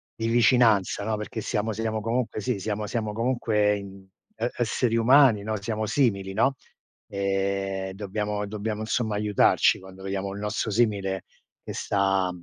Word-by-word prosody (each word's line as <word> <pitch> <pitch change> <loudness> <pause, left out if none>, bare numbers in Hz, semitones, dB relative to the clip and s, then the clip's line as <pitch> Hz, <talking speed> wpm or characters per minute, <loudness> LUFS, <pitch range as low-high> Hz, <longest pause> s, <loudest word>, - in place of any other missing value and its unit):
di 115 - -2
vicinanza, 115 -4 +3
no, 110 -1 -1
perché 105 +1 -5
siamo 110 0 -1
siamo 110 0 -2
comunque 115 0 -1
sì, 125 -1 -1
siamo 105 +1 -3
siamo 110 -2 -2
comunque, 110 -3 +1
ehm, 100 -1 -9 0.3
e 115 +2 -1
esseri 120 0 0
umani, 120 -2 +5
no, 110 -1 -3
siamo 110 0 -2
simili, 100 -7 +1
no, 135 +6 +2 0.5
ehm, 95 -1 -2
dobbiamo 105 +1 -3
dobbiamo 105 +1 -4
insomma 110 -1 -1
aiutarci 105 -1 +3
quando 95 0 -13
vediamo 95 0 -3
il 100 - -7
nostro 105 +1 -2
simile 100 -4 0 0.4
che - - -6
sta 95 -2 +1
105 Hz, 150 wpm, -26 LUFS, 100-115 Hz, 0.5 s, umani